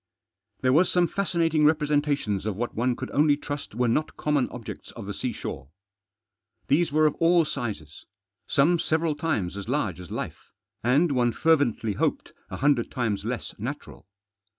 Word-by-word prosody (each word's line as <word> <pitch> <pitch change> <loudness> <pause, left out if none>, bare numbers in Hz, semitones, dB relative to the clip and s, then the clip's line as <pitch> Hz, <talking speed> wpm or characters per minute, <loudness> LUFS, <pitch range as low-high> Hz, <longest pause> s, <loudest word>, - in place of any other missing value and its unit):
There 130 -1 +3
was 170 +5 +4
some 175 -1 +3
fascinating 165 -4 +1
representations 145 -9 +1
of 105 - -1
what 120 +4 -3
one 125 +2 0
could - - -6
only 145 0 +3
trust 145 -6 -6
were 125 +1 +1
not 150 +7 0
common 150 -4 +1
objects 125 -3 -8
of - - -8
the - - -4
seashore. 65 - -5 1.0
These 160 +4 +3
were 155 +1 +3
of 150 - +3
all 170 0 +4
sizes. 110 - -5 0.4
Some 165 +5 +3
several 160 0 +1
times 145 - -2
as 100 +2 -6
large 110 - -1
as 90 -3 -10
life, - - -6 0.3
and, 140 +7 +3
one 120 -3 +2
fervently 140 -9 +2
hoped, - - -1 0.2
a - - -5
hundred 140 -4 +2
times 115 -5 -2
less - - -4
natural. - - -7
145 Hz, 160 wpm, -26 LUFS, 115-155 Hz, 1.0 s, was